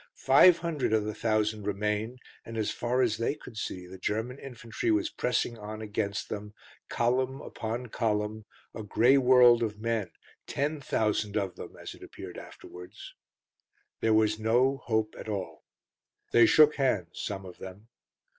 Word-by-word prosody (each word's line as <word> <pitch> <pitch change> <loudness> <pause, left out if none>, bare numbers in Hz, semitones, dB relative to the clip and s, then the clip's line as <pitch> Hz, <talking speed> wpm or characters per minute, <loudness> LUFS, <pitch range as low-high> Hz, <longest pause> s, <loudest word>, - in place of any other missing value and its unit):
Five 165 +6 +6
hundred 160 -9 -1
of 110 -1 +3
the 105 0 -3
thousand 110 -1 0
remained, 105 +4 -1 0.3
and 115 0 -8
as 110 -2 0
far 125 +2 0
as 110 -4 +1
they 115 +5 -1
could 125 -5 -13
see 95 -4 -5
the 95 +1 -11
German 110 +7 -2
infantry 125 - -5
was 330 0 +1
pressing 125 -2 -1
on 105 +1 -7
against 105 -1 -3
them, 105 0 -7 0.3
column 130 +3 0
upon 115 0 -5
column, 105 -2 -2 0.3
a - - -6
grey 120 +6 +4
world 125 -2 +6
of 105 -2 -2
men, 115 -4 -1 0.4
ten 145 +1 -2
thousand 105 -4 0
of 95 -3 -2
them, - - -9
as - - -7
it - - -17
appeared - - -9
afterwards. 90 0 -12 0.9
There 110 -1 +3
was 110 0 +2
no 125 +5 +2
hope 110 -4 -1
at - - -7
all. 95 -6 -5 0.7
They 120 -1 +6
shook 150 +3 +6
hands, 105 - 0
some 95 -2 -4
of 90 -1 -11
them. 95 +4 -10
110 Hz, 160 wpm, -29 LUFS, 105-125 Hz, 0.9 s, Five